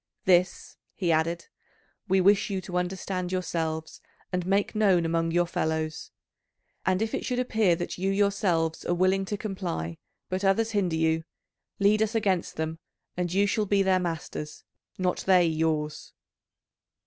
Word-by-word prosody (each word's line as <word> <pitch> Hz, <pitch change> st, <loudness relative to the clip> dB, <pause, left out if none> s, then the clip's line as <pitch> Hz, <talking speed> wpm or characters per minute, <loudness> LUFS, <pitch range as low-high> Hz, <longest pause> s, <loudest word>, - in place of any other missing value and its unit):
This," 180 Hz, 0 st, +2 dB, 0.2 s
he 175 Hz, -4 st, 0 dB
added, 165 Hz, +2 st, 0 dB, 0.6 s
"we 190 Hz, 0 st, +3 dB
wish 200 Hz, +3 st, +4 dB
you 195 Hz, -1 st, -1 dB
to 180 Hz, -1 st, -2 dB
understand 185 Hz, 0 st, -3 dB
yourselves 160 Hz, -3 st, -3 dB, 0.3 s
and 180 Hz, 0 st, 0 dB
make 195 Hz, +1 st, +1 dB
known 195 Hz, -6 st, +3 dB
among 165 Hz, 0 st, 0 dB
your 175 Hz, +1 st, +2 dB
fellows. 160 Hz, -2 st, -2 dB, 0.8 s
And 190 Hz, +2 st, +2 dB
if 220 Hz, -, -3 dB
it -, -, -2 dB
should 250 Hz, -, -2 dB
appear 220 Hz, -7 st, +2 dB
that 175 Hz, +1 st, -5 dB
you 190 Hz, +1 st, 0 dB
yourselves 195 Hz, -5 st, +1 dB
are 175 Hz, -, 0 dB
willing 190 Hz, +2 st, +2 dB
to 205 Hz, +2 st, -3 dB
comply 180 Hz, -, -4 dB, 0.3 s
but 185 Hz, +1 st, -3 dB
others 220 Hz, +4 st, +2 dB
hinder 190 Hz, -6 st, 0 dB
you, 160 Hz, 0 st, +1 dB, 0.5 s
lead 205 Hz, +2 st, +3 dB
us 220 Hz, +1 st, 0 dB
against 195 Hz, -5 st, 0 dB
them, 160 Hz, +1 st, -3 dB, 0.4 s
and 175 Hz, -1 st, -2 dB
you 200 Hz, +2 st, +3 dB
shall 210 Hz, +1 st, 0 dB
be 200 Hz, 0 st, +3 dB
their 190 Hz, -1 st, +3 dB
masters, 160 Hz, -3 st, -5 dB, 0.3 s
not 180 Hz, -1 st, 0 dB
they 180 Hz, -2 st, +6 dB
yours." 155 Hz, -2 st, -1 dB
180 Hz, 155 wpm, -27 LUFS, 165-195 Hz, 0.8 s, they